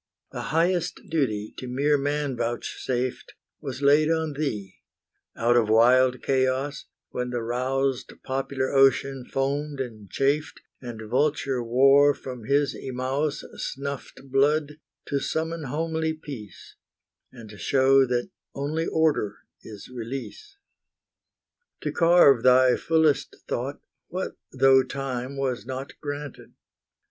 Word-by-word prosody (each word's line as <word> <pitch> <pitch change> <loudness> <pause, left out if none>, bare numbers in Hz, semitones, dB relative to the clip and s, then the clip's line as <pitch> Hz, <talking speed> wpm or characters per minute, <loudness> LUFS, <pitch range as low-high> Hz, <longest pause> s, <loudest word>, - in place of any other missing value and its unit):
The - - -5
highest 170 +2 +1
duty 110 -10 -1
to 130 - -6
mere 140 +4 +2
man 145 -1 -1
vouchsafed 120 +2 -3 0.2
Was 135 -2 -6
laid 150 +2 +5
on 160 -2 0
thee, 110 -10 -4 0.6
out 120 +1 +2
of 115 -3 +3
wild 125 +3 +4
chaos, 135 +2 0 0.3
When 125 0 -3
the 120 -1 -3
roused 130 +2 -1
popular 130 0 -2
ocean 135 -1 +3
foamed 140 +2 -1
and 110 -6 -6
chafed, 140 +3 0 0.2
And 115 -3 -7
vulture 135 +1 +1
War 135 +4 +5
from 125 -4 -8
his 140 +2 +2
Imaus 135 +3 -2 0.2
Snuffed 140 0 -5
blood, 150 +2 +2 0.3
to 140 - -1
summon 160 +2 -3
homely 160 +3 -1
Peace, 135 - -10 0.5
And 115 -4 -12
show 135 0 +4
that 120 0 -1 0.2
only 155 +4 -2
order 155 -10 +1 0.3
is 105 -2 -10
release. 135 - -7 1.2
To - - -2
carve 165 -7 +5
thy 130 0 +5
fullest 160 -3 +1
thought, - - -3 0.3
what - - -4 0.2
though 135 0 +5
Time 135 0 -4
was 130 -5 -2
not 130 +1 -5
granted? 145 -1 -7
135 Hz, 115 wpm, -25 LUFS, 125-145 Hz, 1.2 s, laid